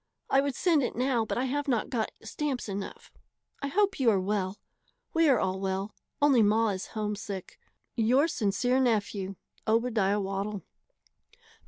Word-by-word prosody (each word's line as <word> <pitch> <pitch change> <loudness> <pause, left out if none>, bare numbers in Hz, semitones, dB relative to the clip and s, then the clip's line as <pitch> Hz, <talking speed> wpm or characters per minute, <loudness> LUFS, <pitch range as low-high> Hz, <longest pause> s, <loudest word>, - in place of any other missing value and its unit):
I 270 - +5
would 280 -2 -2
send 330 -5 +3
it 250 - -2
now 250 -2 +1
but - - -3
I 255 - +1
have 290 +3 -1
not 240 -5 0
got 230 -4 0
stamps 265 +3 -3
enough. 200 -1 -6 0.5
I 280 - -1
hope 395 +5 +1
you 255 -3 +4
are 200 -3 +3
well. 190 0 -1 0.6
We 325 -2 +4
are 255 -5 +5
all 190 0 -1
well, 195 +2 -2 0.3
only 275 -5 +6
ma 220 +2 +3
is 190 -2 -3
homesick. 205 -3 -4 0.4
Your 255 +6 +4
sincere 245 0 +1
nephew, 205 -5 0 0.3
OBADIAH 220 -3 +2
WADDLE. 195 +1 -3
220 Hz, 155 wpm, -29 LUFS, 200-265 Hz, 0.6 s, only